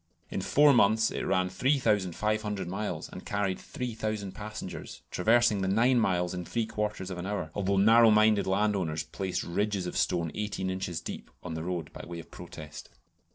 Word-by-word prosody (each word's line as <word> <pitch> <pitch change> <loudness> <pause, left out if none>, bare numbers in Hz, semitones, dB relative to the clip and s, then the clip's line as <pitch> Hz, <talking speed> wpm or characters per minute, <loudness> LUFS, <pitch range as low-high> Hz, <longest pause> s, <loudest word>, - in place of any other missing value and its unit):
In - - -2
four 145 0 +5
months 110 -1 +4
it - - -3
ran 95 -1 +1
3500 105 - 0
miles 100 +4 -3
and - - -9
carried 100 -2 -1
3000 110 -5 -4
passengers, 105 -3 -7
traversing 110 +1 +3
the 95 - 0
nine 120 +6 +4
miles 90 -5 +1
in 90 0 -4
three 115 +5 -1
quarters 105 -3 -3
of 90 - -5
an 90 - -4
hour; 100 -6 -3
although 100 -1 0
narrow 115 +3 +7
minded 105 -1 +4
landowners 95 -6 +1
placed 95 +4 -3
ridges 100 +1 -1
of 90 - -5
stone 85 -3 0
eighteen 105 -3 -2
inches 90 -3 -3
deep - - -7
on 90 - -5
the 80 - -4
road 85 -2 -4
by - - -8
way 85 0 -7
of 85 - -10
protest. 75 -1 -10
100 Hz, 175 wpm, -29 LUFS, 90-110 Hz, -, narrow